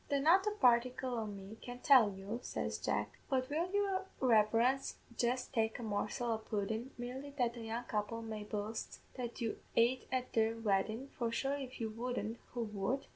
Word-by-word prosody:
"'The 280 - +2
not 355 +8 +5
a - - +3
particle 250 +1 +4
o' 225 -2 -2
me 200 +1 -8
can 245 0 -6
tell 250 -4 +7
you,' 195 +4 -5
says - - -3
Jack; - - -1
'but 255 -1 +1
will 335 +5 0
your 390 -2 +1
reverence 235 +2 +3 0.2
jist 250 +2 0
taste 220 -2 +1
a 245 - -6
morsel 215 +3 -1
o' 220 - 0
pudden, 220 +3 -2
merely 255 +4 -5
that 240 -3 +2
the 235 - -8
young 225 +2 -3
couple 225 +1 -2
may 215 -2 -4
boast 210 +1 -4
that 245 -1 -5
you 225 -2 -1 0.2
ait 240 +3 +3
at 255 -1 -1
their 225 0 +3
weddin'; 220 +3 0
for 235 -4 -2
sure 270 +4 0
if 270 -2 -6
you 225 - -1
wouldn't, 235 0 -3 0.2
who 240 - 0
would?' 210 +5 -1
235 Hz, 185 wpm, -36 LUFS, 220-255 Hz, 0.2 s, tell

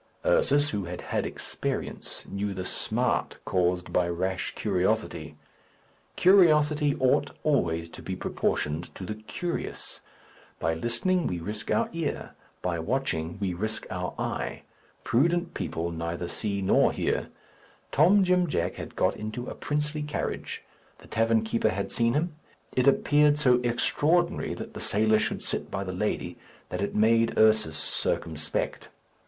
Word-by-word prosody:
Ursus, - - +3
who 100 -3 -2
had 90 +1 -6
had - - -1
experience, - - -4
knew 100 0 -3
the 95 0 -4
smart - - -1
caused 90 0 0
by 90 -1 +2
rash 95 +2 -2
curiosity. - - -1 0.8
Curiosity 150 -6 +5
ought 135 0 +2
always 85 - +1
to - - -11
be - - -4
proportioned 75 +4 -2
to 95 - -6
the 105 - -3
curious. 110 +11 -5 0.6
By 80 - +1
listening, 120 - 0
we 90 - -2
risk 105 +5 -5
our 230 - +2
ear; 165 -3 -3 0.3
by 85 -2 -1
watching, 85 -6 -1
we 95 -3 -1
risk 110 +5 -3
our 90 -1 -3
eye. - - -3 0.4
Prudent 170 +8 +2
people 85 +1 -3
neither 85 +1 -3
hear 100 -1 -2
nor 95 - +4
see. - - +1 0.8
Tom 185 +8 +5
Jim 180 -1 +3
Jack 90 - -1
had - - -7
got - - +2
into 110 +3 -5
a - - -5
princely 150 +1 -2
carriage. 150 0 -4 0.3
The - - -16
tavern 115 0 +2
keeper 110 0 +1
had 100 -1 -3
seen 115 +1 +2
him. 165 +2 0 0.4
It 125 +1 +3
appeared 145 +1 +4
so 125 -4 +4
extraordinary 155 +8 +1
that - - -7
the - - -7
sailor 110 +1 +4
should 110 - -2
sit - - -1
by 95 - -3
the 95 -1 -5
lady 105 +4 -2 0.3
that 90 - -3
it 100 - -2
made 115 +1 +3
Ursus 110 -8 +4
circumspect. 80 0 -1
110 Hz, 145 wpm, -27 LUFS, 90-150 Hz, 0.8 s, Curiosity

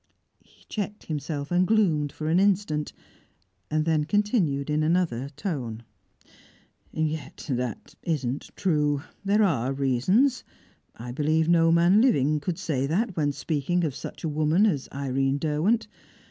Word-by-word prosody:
He - - -26
checked 210 0 -4
himself, 145 -1 -4
and 180 +1 +3
gloomed 165 -10 +2
for 155 - -5
an 165 +3 +3
instant, 190 -7 +1 0.8
then 155 0 +1
continued 180 - +1
in 150 0 0
another 155 -6 0
tone: 125 - -4 1.1
"Yet 155 -1 -3
that 125 -3 -3
isn't 140 -5 -2
true. 150 -6 +1 0.2
There 205 +2 +3
are 135 - +1
reasons 140 - +2 0.5
I 120 +2 -7
believe 155 +4 +1
no 165 -1 +4
man 175 +5 +5
living 155 - +3
could 165 +4 -3
say 150 -8 -1
that 190 +5 0
when 145 -3 +1
speaking 150 +5 -1
of 155 -5 -1
such - - -8
a - - 0
woman 155 +6 +2
as 150 -11 0
Irene 135 0 0
Derwent. 160 +10 +1
155 Hz, 135 wpm, -26 LUFS, 140-180 Hz, 1.1 s, man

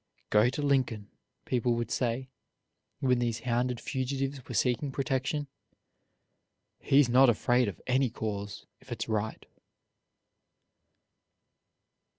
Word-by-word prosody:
"Go 105 +3 +5
to 145 +3 -3
Lincoln," 130 -7 0 0.3
people 120 -1 +1
would 115 -1 -3
say, 125 +1 -1 0.7
when 125 -2 +3
these 115 -2 -1
hounded 125 0 0
fugitives 135 0 -3
were 125 - -6
seeking 125 +5 +1
protection; 135 +2 -1 1.3
"he's 140 -1 +4
not 125 +2 +6
afraid 120 +2 +2
of 100 - -5
any 130 0 +2
cause, 105 -3 -5
if - - -18
it's - - -3
right." 110 -1 -2
125 Hz, 110 wpm, -29 LUFS, 115-135 Hz, 1.3 s, not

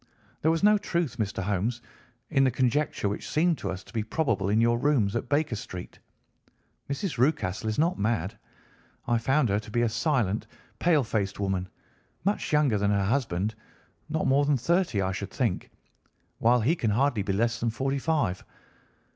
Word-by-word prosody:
There 160 - +3
was 165 +3 +1
no 210 0 +6
truth, 170 - -2
Mr. 100 -3 -2
Holmes, 105 +5 -1 0.5
in 135 -3 +4
the 130 - +4
conjecture 130 -1 0
which 100 - -4
seemed 165 +1 +2
to - - -3
us 95 +1 -5
to - - -17
be 115 - 0
probable 105 -4 0
in 105 +2 +3
your 120 +1 +3
rooms 120 -8 +2
at 120 +1 -3
Baker 145 -3 +1
Street. 90 -4 -8 0.9
Mrs. 140 - -3
Rucastle 120 - +1
is 110 - -2
not 165 +4 +1
mad. 105 -1 0 0.7
I 120 -1 +2
found 130 +2 +2
her 100 +1 +2
to 110 - -10
be 120 +2 +1
a 115 - +2
silent, 115 - 0 0.3
pale 160 -5 +3
faced 105 -4 -2
woman, 95 -2 -1 0.6
much 205 +1 0
younger 145 -8 +3
than 100 0 +1
her 100 -1 +2
husband, 110 -4 0 0.6
not 160 +1 -1
more 140 +2 +4
than 145 -1 +2
thirty, 165 - +1
I 95 - 0
should 95 +1 -4
think, 115 -8 -1 0.7
while 120 +1 +4
he 145 +10 +2
can 115 -9 -1
hardly 120 +1 +2
be 100 0 -2
less 115 +3 +1
than 115 - 0
forty 135 +4 -1
five. 130 - 0
120 Hz, 180 wpm, -27 LUFS, 105-145 Hz, 0.9 s, no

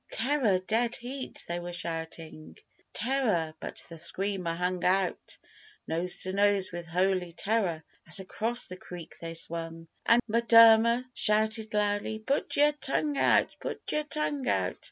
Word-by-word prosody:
'Terror!' 245 -5 +2
'Dead 225 +6 0
heat!' 260 +2 -6
they 175 0 -2
were 175 0 -6
shouting 165 -2 -6 0.3
'Terror!' 220 -11 0
but - - -5
the 165 -1 -10
Screamer 185 0 -2
hung 180 +1 -2
out 185 0 0 0.5
Nose 170 +3 -3
to 185 - -4
nose 200 -1 +2
with 175 -1 -6
Holy 180 0 0
Terror 190 -5 -1 0.2
as - - +2
across 225 +5 0
the 185 - -8
creek 175 -3 -10
they 165 0 -6
swung, 165 0 -4 0.2
An' 235 +1 +6
M'Durmer 230 +1 +6
shouted 215 0 0
loudly, 205 +1 0
'Put 270 +6 -1
yer 295 +1 +5
tongue 295 0 -1
out! - - +3
put - - -5
yer 300 - +1
tongue 295 -3 -2
out! - - 0
200 Hz, 145 wpm, -29 LUFS, 175-235 Hz, 0.5 s, An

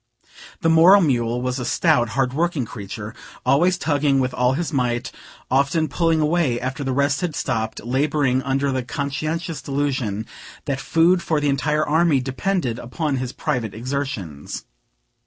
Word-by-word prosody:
The 165 - +2
moral 170 +5 +7
mule 120 -5 +1
was 125 +1 -2
a - - -3
stout, 125 -1 +2
hard 130 -2 +1
working 160 -3 0
creature, 105 +1 -7 0.3
always 175 +6 +3
tugging 145 -4 +1
with 130 -1 0
all 125 +1 +2
his 165 +3 -3
might; 120 -3 -1 0.4
often 140 +4 +2
pulling 165 +2 +1
away 150 -6 +1
after 130 +3 -4
the 135 - -1
rest 140 +1 +1
had 175 -4 -2
stopped, 110 -6 -2
laboring 130 +1 +1
under 135 +1 0
the 130 -1 -1
conscientious 150 +4 -3
delusion 130 -7 -2 0.4
that 140 -3 -2
food 170 +2 +3
for 155 -3 0
the 145 -1 +1
entire 150 +3 +1
army 160 -2 +3
depended 130 0 -2
upon 135 +4 -2
his 125 -1 -3
private 115 -6 -3
exertions. 115 - -4
135 Hz, 155 wpm, -22 LUFS, 125-155 Hz, 0.4 s, moral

